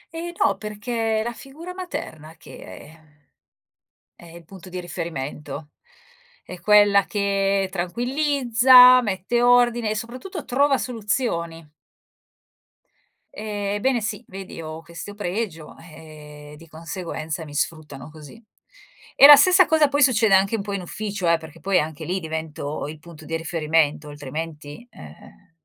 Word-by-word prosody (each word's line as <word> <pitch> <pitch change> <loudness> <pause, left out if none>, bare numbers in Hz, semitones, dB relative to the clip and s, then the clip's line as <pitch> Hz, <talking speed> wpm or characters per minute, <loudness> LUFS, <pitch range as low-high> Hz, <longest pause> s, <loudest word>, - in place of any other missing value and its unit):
Ehm, 345 +1 -5
no, 195 - +1
perché 220 +1 -2
è - - -2
la 240 +1 -4
figura 305 +9 -10
materna 165 - -8
che - - -14
è, - - -11
ehm, 150 -2 -22 0.9
è - - -17
il 170 - -12
punto 185 +2 -14
di 180 0 -6
riferimento, 150 -4 -6 0.7
è 180 - -10
quella 205 -1 +5
che 195 -1 0
tranquillizza, 250 - +5
mette 210 +2 -2
ordine 240 -2 +3
e - - -2
soprattutto 255 - -7
trova 275 +2 +2
soluzioni. 200 - -3 1.6
Ehm, 205 -2 -4
ebbene 245 +4 0
sì. 210 -1 -4
Vedi 190 -3 -9
ho 155 0 -8
questo 170 +5 -9
pregio, 185 -5 -5
ehm, 150 -2 -13
di 165 +2 -16
conseguenza 160 -1 -6
mi 145 -1 -11
sfruttano 150 -3 -4
così. 155 +8 -14 0.7
E - - +8
la 290 +1 +12
stessa 370 +4 +5
cosa 315 -2 +3
poi 285 +1 +2
succede 225 -6 +4
anche 195 +3 +2
un 220 - -3
po' 200 0 -6
in 195 - -3
ufficio 200 0 -4
eh, 170 - +4
perché 160 0 -13
poi 190 +3 +1
anche 155 -1 -5
lì 185 +2 -2
divento 160 -3 -5
il 155 +1 -9
punto 160 -1 -14
di 165 - -4
riferimento, 155 -2 0
altrimenti, 150 - -8
ehm, 75 - -15
190 Hz, 145 wpm, -22 LUFS, 160-230 Hz, 1.6 s, la